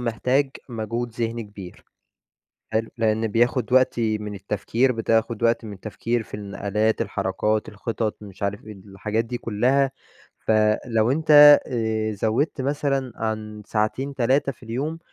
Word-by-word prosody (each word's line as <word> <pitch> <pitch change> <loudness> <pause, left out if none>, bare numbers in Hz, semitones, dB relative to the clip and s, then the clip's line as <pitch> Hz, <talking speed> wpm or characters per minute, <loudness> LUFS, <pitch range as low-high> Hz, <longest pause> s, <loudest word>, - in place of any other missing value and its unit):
محتاج 125 +4 +1 0.2
موجود 115 +1 -3
ذهني 115 0 -3
كبير، 100 -4 -11 0.9
حلو؟ 110 0 0
لأن 110 0 +1
بياخد 120 +2 +1
وقتي 115 -4 +3
من 105 -1 -6
التفكير، 105 +6 0
بتاخد 115 0 0
وقت 115 0 +2
من 105 - -7
التفكير 110 +4 -3
في - - -21
النقلات، 105 +2 -1
الحركات، 100 +2 -1
الخطط، 110 +1 -3
مش 100 -1 -10
عارف 100 +1 -3
إيه 110 - -8
الحاجات 105 +3 -3
دي 120 +1 -4
كلها، 130 +6 +1 0.5
فلو 110 +2 +2
أنت 145 -1 +8
آآ 110 -3 -1
زوِّدت 120 +8 0
مثلًا 135 -2 -1
عن 110 -1 -4
ساعتين، 130 +6 -1
3 135 +3 +2
في 125 - -18
اليوم 140 +9 -3
115 Hz, 135 wpm, -23 LUFS, 105-125 Hz, 0.9 s, أنت